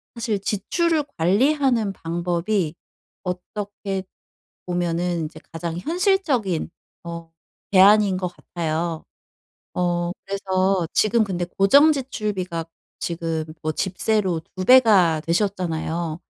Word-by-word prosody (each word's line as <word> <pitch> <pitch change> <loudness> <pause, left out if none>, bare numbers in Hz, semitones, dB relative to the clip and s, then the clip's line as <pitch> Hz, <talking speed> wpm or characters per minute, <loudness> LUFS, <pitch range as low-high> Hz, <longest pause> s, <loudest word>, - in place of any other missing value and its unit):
사실 225 -3 -1
지출을 310 - 0
관리하는 235 - +2
방법이 175 +1 -1 0.5
어떻게 195 +1 -4 0.6
보면은 175 -1 -1
이제 155 +1 -9
가장 165 0 -4
현실적인 305 - 0 0.3
어 170 -1 -8 0.4
대안인 200 0 +6
것 185 -1 -2
같아요. 165 -1 -3 0.7
어 175 -1 0
그래서 190 -2 0
지금 220 +1 +3
근데 180 -3 -2
고정 195 - +5
지출비가 210 - -3 0.4
지금 165 -2 -2 0.2
뭐 155 - 0
집세로 190 0 0 0.2
2 185 - -3
배가 205 -10 +6
되셨잖아요. 170 -3 -1
185 Hz, 225 characters per minute, -23 LUFS, 170-215 Hz, 0.7 s, 대안인